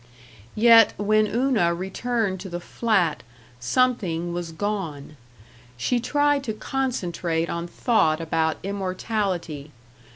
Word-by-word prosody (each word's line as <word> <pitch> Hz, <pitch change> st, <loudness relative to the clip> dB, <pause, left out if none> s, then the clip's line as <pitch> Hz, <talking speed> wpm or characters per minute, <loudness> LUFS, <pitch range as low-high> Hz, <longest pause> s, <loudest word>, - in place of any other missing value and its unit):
Yet, 230 Hz, 0 st, +7 dB
when 215 Hz, +1 st, +2 dB
Una 225 Hz, -8 st, +1 dB
returned 195 Hz, +2 st, -2 dB
to 190 Hz, +1 st, -7 dB
the 175 Hz, 0 st, -4 dB
flat, 190 Hz, -4 st, 0 dB, 0.4 s
something 175 Hz, -, 0 dB
was 175 Hz, -1 st, -4 dB
gone. 160 Hz, -6 st, -4 dB, 0.6 s
She 240 Hz, -, 0 dB
tried 290 Hz, +2 st, +1 dB
to 220 Hz, -, -2 dB
concentrate 180 Hz, -9 st, -2 dB
on 170 Hz, 0 st, -3 dB
thought 175 Hz, -5 st, +1 dB
about 160 Hz, -1 st, 0 dB
immortality. 185 Hz, -5 st, -3 dB
190 Hz, 105 wpm, -24 LUFS, 170-230 Hz, 0.6 s, Yet